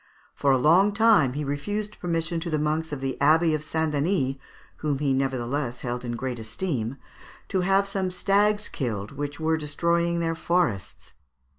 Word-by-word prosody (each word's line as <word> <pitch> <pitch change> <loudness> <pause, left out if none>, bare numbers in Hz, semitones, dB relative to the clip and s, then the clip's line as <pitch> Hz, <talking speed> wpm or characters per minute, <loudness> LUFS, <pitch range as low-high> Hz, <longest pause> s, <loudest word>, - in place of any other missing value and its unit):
For 140 - 0
a 135 - +4
long 175 +10 +4
time 205 - +4
he 150 +2 -3
refused 205 +10 -3
permission 165 -1 -1
to 170 +1 -4
the 155 - 0
monks 155 +2 -1
of 145 -2 -4
the 135 -1 -3
Abbey 160 +3 +4
of 155 -1 -1
St. 160 0 -1
Denis, 145 -3 0 0.4
whom 150 -3 -1
he 140 -1 +1
nevertheless 130 -1 -2
held 120 0 -3
in 120 -1 -3
great 125 0 -4
esteem, 120 +1 -3 0.5
to 190 -2 +1
have 195 +2 +3
some 195 -2 -1
stags 205 +3 +2
killed 110 -6 -4
which 145 +1 -5
were 160 0 +1
destroying 170 +3 0
their 165 -1 0
forests. 100 - -1
155 Hz, 170 wpm, -25 LUFS, 135-175 Hz, 0.5 s, a